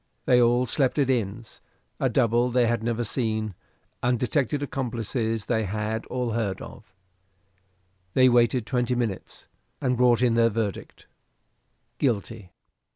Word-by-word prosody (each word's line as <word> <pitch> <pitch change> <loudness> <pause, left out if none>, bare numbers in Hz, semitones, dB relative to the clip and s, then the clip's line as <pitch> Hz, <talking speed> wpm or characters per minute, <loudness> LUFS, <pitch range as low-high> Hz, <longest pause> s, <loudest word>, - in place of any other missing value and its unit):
They 125 -1 +5
all 120 +1 +3
slept 130 +3 0
at 135 -2 +2
inns; 115 -2 -3 0.4
a 130 - +1
double 120 0 +2
they 125 0 +2
had 115 -1 0
never 120 +1 -1
seen; 110 -2 -1 0.5
undetected 125 +3 0
accomplices 115 -4 -2
they 110 -2 0
had 110 +3 -3
all 125 -2 -2
heard 105 -4 -2
of. 95 - -12 1.2
They 130 0 +6
waited 120 -1 +3
twenty 125 +1 0
minutes, 115 -6 -4 0.3
and 125 -3 0
brought 125 0 +3
in 120 -2 +3
their 115 0 +4
verdict 110 -2 -4 0.9
Guilty. 110 -5 -2
120 Hz, 130 wpm, -25 LUFS, 110-125 Hz, 1.2 s, They